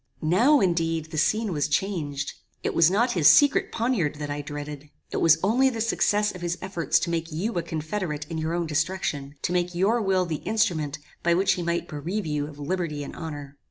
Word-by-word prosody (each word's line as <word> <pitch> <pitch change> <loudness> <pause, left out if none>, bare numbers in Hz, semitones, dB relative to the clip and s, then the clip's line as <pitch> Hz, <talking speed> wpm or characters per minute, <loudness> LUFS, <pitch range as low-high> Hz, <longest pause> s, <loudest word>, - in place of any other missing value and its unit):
"Now, 235 - +4
indeed, 165 -3 0
the 155 - -1
scene 215 +4 +1
was 145 -2 0
changed. 150 -5 -2 0.3
It - - -1
was 165 0 +5
not 235 +6 +2
his 170 -9 +4
secret 285 - +5
poniard 225 - 0
that 145 -1 -5
I 145 0 -3
dreaded. 145 0 -7 0.2
It - - -2
was 165 -1 +5
only 250 +7 +4
the 230 -3 -5
success 210 -2 +1
of 180 - -9
his 175 0 -2
efforts 185 -3 0
to 170 - -1
make 165 0 -2
you 190 +9 -2
a 175 - 0
confederate 155 -1 -4
in 160 0 -4
your 160 +2 -1
own 175 -1 -1
destruction, 150 -3 -2
to 175 - 0
make 180 0 0
your 210 +7 +2
will 190 -2 +2
the 160 -3 -2
instrument 170 -10 0 0.2
by 170 0 +3
which 190 +2 +3
he 180 - -3
might 170 0 -1
bereave 175 +7 -4
you 150 -1 -2
of 145 -1 -11
liberty 150 -1 -3
and - - -8
honor. 145 -4 -7
170 Hz, 210 wpm, -25 LUFS, 150-195 Hz, 0.3 s, was